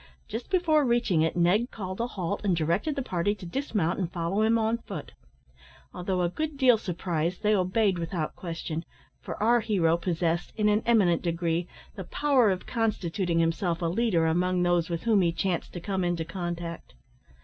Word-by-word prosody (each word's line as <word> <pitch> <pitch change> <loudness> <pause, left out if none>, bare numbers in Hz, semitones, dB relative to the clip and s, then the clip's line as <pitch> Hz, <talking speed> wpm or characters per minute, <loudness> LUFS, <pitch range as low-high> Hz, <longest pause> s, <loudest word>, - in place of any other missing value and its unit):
Just 225 +3 -6
before 335 -5 +3
reaching 235 - +2
it 160 +2 0
Ned 190 +8 +3
called 185 0 -5
a 235 - 0
halt, 195 -3 -3
and 195 -4 +2
directed 170 - 0
the 275 - -2
party 190 0 0
to 190 -3 -10
dismount 200 - -1
and 175 -3 -2
follow 175 +4 -1
him 225 +1 +4
on 225 +1 0
foot. 195 -10 -8 0.8
Although 180 0 -1
a 175 - +1
good 310 - -4
deal 250 -4 +5
surprised, 175 -2 -2
they 210 0 +4
obeyed 190 0 +2
without 165 -2 -3
question; 165 -2 -5 0.4
for - - -6
our 235 +3 +3
hero 180 -7 +2
possessed, 170 -1 -1
in 210 -1 +2
an 210 +1 +3
eminent 195 -8 +4
degree, 170 0 -1 0.3
the 190 - -6
power 270 -4 +3
of 185 -1 -2
constituting 195 -6 -1
himself 165 +1 +1
a 170 - -2
leader 175 -1 +1
among 180 +2 +1
those 175 -1 +2
with 170 -1 -3
whom 220 -4 +4
he 170 -2 +2
chanced 175 0 -2
to 175 - -5
come 190 +1 -2
into 175 -2 -1
contact. 170 - -5
185 Hz, 180 wpm, -27 LUFS, 170-220 Hz, 0.8 s, deal